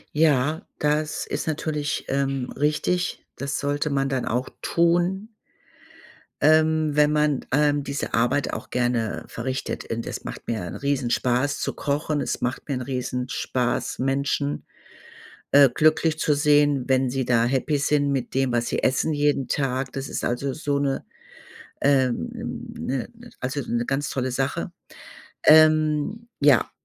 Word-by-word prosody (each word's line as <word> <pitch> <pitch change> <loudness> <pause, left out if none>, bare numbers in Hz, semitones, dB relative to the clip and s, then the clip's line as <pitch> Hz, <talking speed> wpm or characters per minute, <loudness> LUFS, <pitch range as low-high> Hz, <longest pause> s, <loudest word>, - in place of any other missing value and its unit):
Ja, 150 0 +3 0.2
das 150 +1 0
ist - - -4
natürlich, 150 -1 -2
ähm, 135 -2 -1
richtig. 155 +5 -1
Das 140 0 -3
sollte 145 +1 -1
man 135 -1 0
dann 130 -2 -1
auch 125 +2 -1
tun 175 +6 +1 1.1
ähm, 155 0 +4
wenn 150 0 +4
man, 150 -2 +1
ähm, 145 0 +3
diese 140 0 -4
Arbeit 120 +4 +1
auch - - -6
gerne 120 -3 -1
verrichtet. 130 0 -4
Und 115 0 -3
es - - -5
macht - - -8
mir 115 -3 -2
'n - - -6
Riesenspaß 130 0 0
zu - - -2
kochen. 145 +1 -1
Es - - -3
macht 125 +2 -3
mir 140 - 0
'n 125 - -3
Riesenspaß, 125 -1 -2
Menschen, 140 +2 -1 0.9
äh, 140 -1 +7
glücklich 155 +1 +2
zu 150 - +2
sehen, 145 -2 +3
wenn 130 -1 +2
sie 130 0 -1
da 115 -1 +3
Happy 135 +4 0
sind 145 0 +1
mit 135 -3 -2
dem, 135 -1 +2
was 120 0 0
sie - - -2
essen 130 +4 +1
jeden 145 -2 +1
Tag. 130 -2 -1
Das 135 0 -4
ist - - -4
also 130 +3 -1
so 145 -1 -1
'ne, 140 -1 -1 0.8
ähm, 130 -3 0
'ne 125 +9 -3 0.3
also, 135 +3 -2
'ne 120 0 0
ganz 135 +2 -1
tolle 130 -1 -2
Sache. 135 +2 -2 0.7
Ähm, 155 +7 +4
ja, 140 -5 +4
140 Hz, 145 wpm, -24 LUFS, 130-150 Hz, 1.1 s, äh